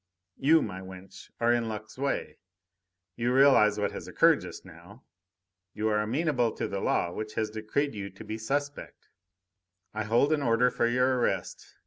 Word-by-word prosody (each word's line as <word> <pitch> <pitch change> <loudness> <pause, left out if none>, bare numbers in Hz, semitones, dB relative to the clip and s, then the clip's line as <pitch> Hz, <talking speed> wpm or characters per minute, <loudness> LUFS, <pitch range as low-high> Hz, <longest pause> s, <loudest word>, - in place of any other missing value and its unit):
You, 160 +2 +4
my 95 -3 -6
wench, 95 0 -12
are 120 0 +3
in 115 -1 0
luck's 110 0 -7
way. 140 +1 -3 0.8
You 120 +1 -1
realise 130 -5 +5
what 105 - -1
has - - -8
occurred - - +4
just - - -9
now. - - -15 0.7
You 110 +1 0
are 105 0 +1
amenable 125 0 0
to - - -3
the 100 - -4
law 85 - 0
which 110 +3 -6
has 110 -1 -1
decreed 110 +7 -2
you 100 -2 -6
to 95 - -12
be 110 +1 -6
suspect. 145 +5 -4 0.8
I 110 0 -3
hold 120 +7 +3
an 150 - 0
order 125 0 +3
for - - +1
your 125 +1 +2
arrest. - - -3
115 Hz, 170 wpm, -28 LUFS, 105-130 Hz, 0.8 s, realise